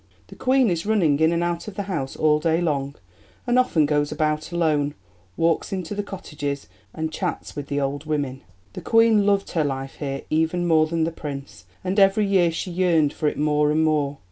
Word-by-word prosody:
The - - -11
Queen 255 -4 +2
is 170 +3 -2
running 170 -10 +2
in 160 +1 +4
and 170 0 0
out 175 +2 -2
of 210 - -7
the 200 - -3
house 155 -9 -4
all 150 -1 +3
day 165 +1 +1
long, 140 -5 -1 0.5
and 245 0 +3
often 165 -12 +3
goes 145 0 0
about 155 +1 -1
alone, 150 -4 +1 0.4
walks 165 -1 +1
into 185 -1 -4
the 205 - -2
cottages, 145 -8 -5 0.2
and 160 0 -4
chats - - -4
with 145 -1 -5
the 145 - -1
old 140 +2 -2
women." 140 -4 -2 0.3
The - - -7
Queen 225 -3 +4
loved 200 -1 +1
her 160 - +1
life 135 -1 -4
here 140 -2 -4
even 160 +3 +1
more 160 -2 +4
than 165 0 0
the 165 - 0
Prince, 140 - -8 0.2
and 190 +2 0
every 195 +2 +4
year 190 -4 +3
she 170 +3 -4
yearned 170 -5 +2
for 155 - -1
it - - -1
more 150 0 +2
and 155 +1 +2
more. 145 -2 +1
160 Hz, 205 wpm, -23 LUFS, 145-180 Hz, 0.5 s, in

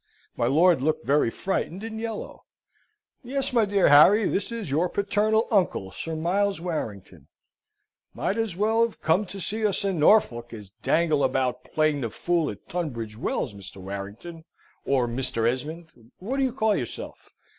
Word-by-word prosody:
My 120 - 0
lord 165 +3 +4
looked 155 +2 0
very 145 -3 +3
frightened 190 - -3
and 220 0 -5
yellow. 225 -2 -6 0.8
"Yes, 270 +1 -2
my 230 -3 +4
dear 200 -1 +3
Harry. 195 +9 +7
This 205 - -1
is 225 -10 -5
your 165 +5 +1
paternal 210 +3 +1
uncle, 180 - +1
Sir 165 +10 -5
Miles 190 +5 0
Warrington." 100 - -5 0.9
"Might 195 - -1
as 225 -6 -2
well 220 +4 +2
have 230 -1 0
come 180 +6 +1
to 195 - -7
see 215 +4 -2
us 205 -1 +1
in 190 -4 -1
Norfolk, 125 - +3
as 105 -4 -10
dangle 155 -3 +2
about 130 -1 0
playing 155 -2 +1
the 115 - -2
fool 170 +7 0
at 100 - -9
Tunbridge 120 -11 -4
Wells, 110 -1 -2
Mr. 100 -1 -10
Warrington, 100 - -8 0.4
or 130 -3 +2
Mr. 120 -2 -1
Esmond, 155 +7 -3 0.3
which 255 +9 -3
do 270 - +3
you 260 - -1
call 220 -4 +1
yourself?" 120 - -6
165 Hz, 165 wpm, -25 LUFS, 125-205 Hz, 0.9 s, Harry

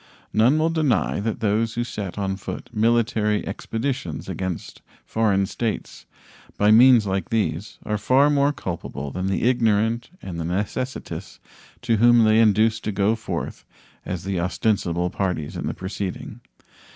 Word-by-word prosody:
None 120 +7 +4
will 160 +1 +2
deny 155 -11 +1
that 110 +2 -3
those 110 +1 +1
who 120 - 0
set 105 -6 -6
on 95 -1 -1
foot 95 - -7
military 110 -2 +1
expeditions 115 - -4
against 95 -3 -5 0.2
foreign 100 -3 +1
states 110 +2 -4 0.5
by 105 +1 +4
means 120 0 +7
like 95 -2 -2
these 110 -2 -2
are 105 -1 -1
far 135 +7 +4
more 140 0 +3
culpable 85 - -5
than 95 +4 -3
the 95 - -1
ignorant 115 -1 +2
and 90 -3 -7
the - - -2
necessitous 105 +9 -4 0.5
whom 120 0 +5
they 110 0 +4
induce 110 +1 +4
to 110 - -3
go 100 +2 +2
forth 115 - -5 0.4
as 90 -2 -5
the 95 -2 -2
ostensible 90 -2 0
parties 90 -6 -2
in - - -4
the - - -2
proceeding. 95 0 -5
110 Hz, 145 wpm, -23 LUFS, 95-115 Hz, 0.5 s, means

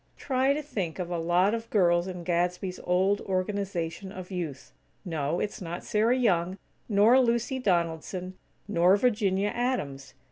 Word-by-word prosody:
Try 265 0 +1
to 300 - -3
think 195 - -4
of 180 -2 -4
a 175 - -1
lot 175 +5 +2
of 230 0 -4
girls 175 -3 +3
in 180 -2 -6
Gadsby's 180 +1 -1
old 190 +3 +2
Organization 190 -1 -3
of 185 0 -9
Youth. 165 -7 -5 0.3
No, 160 -1 -1
it's 210 +2 -3
not 175 0 -5
Sarah 225 +4 +2
Young, 185 -6 +1 0.3
nor 215 +5 +5
Lucy 240 +1 +1
Donaldson, 180 -2 -1 0.3
nor 185 -1 +4
Virginia 205 -4 +1
Adams. 210 - -3
185 Hz, 145 wpm, -28 LUFS, 175-215 Hz, 0.3 s, nor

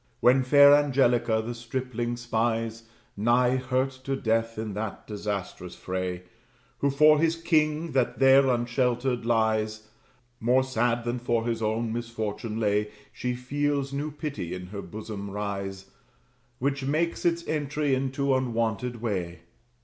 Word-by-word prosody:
When 130 +2 +5
fair 140 +2 +7
Angelica 125 -6 +3
the 120 - -3
stripling 120 0 -3
spies, 115 -1 -1 0.3
Nigh 120 +4 +3
hurt 130 +1 0
to 135 - 0
death 115 -2 0
in 110 -1 -4
that 105 +1 -5
disastrous 100 -4 -5
fray, 90 -1 -4 0.6
Who 140 - +2
for 150 +2 +5
his 165 +1 +2
king, 160 -1 +1
that 130 -2 +1
there 135 0 +6
unsheltered 120 0 0
lies, 110 -1 0 0.5
More 125 +3 +3
sad 120 -2 0
than 120 +1 -2
for 120 -1 0
his 115 -1 -2
own 110 +1 -1
misfortune 115 -1 -4
lay, 105 -1 +1 0.2
She 125 0 -2
feels 140 +2 -1
new 145 +2 -2
pity 145 - -5
in 90 0 -7
her 100 - -4
bosom 105 -1 -7
rise, 100 -1 -5 0.7
Which 140 +1 -1
makes 155 +5 0
its 170 0 0
entry 150 -1 -1
in 130 0 0
unwonted 120 -4 0
way. 90 -7 -3
120 Hz, 135 wpm, -27 LUFS, 110-135 Hz, 0.7 s, fair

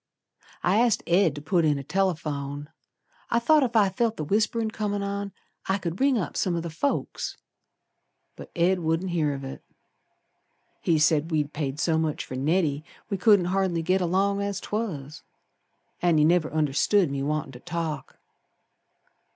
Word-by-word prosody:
I 190 - +3
asked 235 -2 +2
Ed 175 -3 +3
to 145 - -8
put 170 +2 +2
in 150 -2 +2
a 140 - -5
telephone. 150 -5 -2 0.6
I 230 - +2
thought 300 +6 +4
ef 245 -3 -1
I 205 -3 +5
felt 225 +4 -1
the 155 - -3
whisperin' 220 +4 0
comin' 205 -2 -2
on 200 0 -3 0.4
I 190 - +2
could 175 0 -5
ring 270 -2 +4
up 190 - -3
some 185 -6 0
o' - - 0
th' 165 -1 -6
folks. 280 - -2 1.0
But - - -10
Ed 180 +2 +2
wouldn't 165 +2 -1
hear 155 -4 +1
of 135 - -7
it. 135 - -8 1.2
He 165 - +2
said 155 0 +3
we'd 150 -2 -1
paid 145 -1 -3
so 160 -1 +2
much 155 -2 -2
for - - -9
Neddy 150 +1 +1 0.3
We 195 - 0
couldn't 200 -1 +5
hardly 185 -4 0
git 185 +3 +2
along 195 +3 +1
as 200 -1 -2
'twas. 160 -10 -4 0.8
An' 175 -2 +3
he 150 - +5
never 170 -1 +2
understood 155 +4 +2
me 140 -1 -2
wantin' 150 0 -2
to 125 - -11
talk. 160 0 -4
170 Hz, 165 wpm, -26 LUFS, 150-200 Hz, 1.2 s, I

